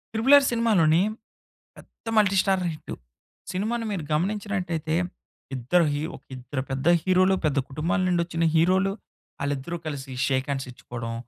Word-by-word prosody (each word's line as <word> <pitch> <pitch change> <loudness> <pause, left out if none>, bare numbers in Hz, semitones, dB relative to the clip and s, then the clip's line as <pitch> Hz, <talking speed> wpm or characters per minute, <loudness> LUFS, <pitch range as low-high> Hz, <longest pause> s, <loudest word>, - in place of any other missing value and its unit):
'Triple 240 +6 +4
R' 275 -1 +3
సినిమాలోని 205 -9 +3 0.8
పెద్ద - - -18
multi 200 -2 +4
starrer 190 -2 +1
hit. 155 - -8 0.6
సినిమాను 225 +5 -2
మీరు 185 -6 -3
గమనించినట్లయితే 180 -2 -1 0.6
ఇద్దరు 155 +8 +2
హీరో 150 +3 -2
ఒక - - -22
ఇద్దరు 130 +2 -4
పెద్ద 135 +2 -3 0.2
హీరోలు 185 +1 +4
పెద్ద 145 -2 +1
కుటుంబాల 155 +7 -1
నుండొచ్చిన 170 -2 0
హీరోలు, 185 +4 +3 0.5
వాళ్ళిద్దరూ 140 +4 -3
కలిసి 140 -3 -5
షేక్ 130 -1 0
హ్యాండ్స్ 135 -1 -2
ఇచ్చుకోవడం. 120 -1 -7
170 Hz, 135 wpm, -25 LUFS, 145-195 Hz, 0.8 s, Triple